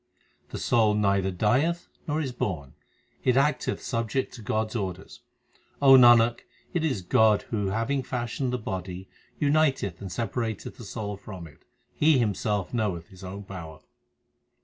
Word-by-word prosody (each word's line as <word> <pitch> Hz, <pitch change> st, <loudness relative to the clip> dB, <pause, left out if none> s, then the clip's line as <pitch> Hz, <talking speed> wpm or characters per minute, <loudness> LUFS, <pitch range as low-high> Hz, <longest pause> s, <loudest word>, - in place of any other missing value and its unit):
The -, -, -5 dB
soul 110 Hz, -3 st, +3 dB
neither 100 Hz, -2 st, +2 dB
dieth 130 Hz, -, +1 dB, 0.2 s
nor 155 Hz, 0 st, 0 dB
is 140 Hz, -5 st, -2 dB
born; 80 Hz, -, -4 dB, 0.5 s
It 125 Hz, 0 st, +3 dB
acteth 140 Hz, -2 st, +1 dB
subject 115 Hz, +3 st, -2 dB
to 120 Hz, -, -10 dB
God 110 Hz, 0 st, -1 dB
s -, -, -8 dB
orders. 95 Hz, -4 st, -5 dB, 0.6 s
O 140 Hz, -1 st, +6 dB
Nanak, 120 Hz, -2 st, +7 dB, 0.3 s
it 175 Hz, -, 0 dB
is 130 Hz, -, -1 dB
God 110 Hz, +3 st, +4 dB
who 105 Hz, -3 st, 0 dB
having 115 Hz, +7 st, 0 dB
fashioned 125 Hz, +1 st, -3 dB
the 125 Hz, -, 0 dB
body 95 Hz, -3 st, -5 dB, 0.3 s
uniteth 140 Hz, -, +1 dB
and 95 Hz, -2 st, -6 dB
separateth 115 Hz, +1 st, -3 dB
the 120 Hz, -, -9 dB
soul 105 Hz, -1 st, -5 dB
from 95 Hz, -3 st, -9 dB
it 75 Hz, -, -17 dB, 0.3 s
He 155 Hz, -1 st, +4 dB
Himself 105 Hz, -3 st, -1 dB
knoweth 100 Hz, -7 st, -2 dB
His 95 Hz, -1 st, -14 dB
own 95 Hz, +2 st, -7 dB
power. 80 Hz, -5 st, -9 dB
110 Hz, 150 wpm, -27 LUFS, 95-125 Hz, 0.6 s, Nanak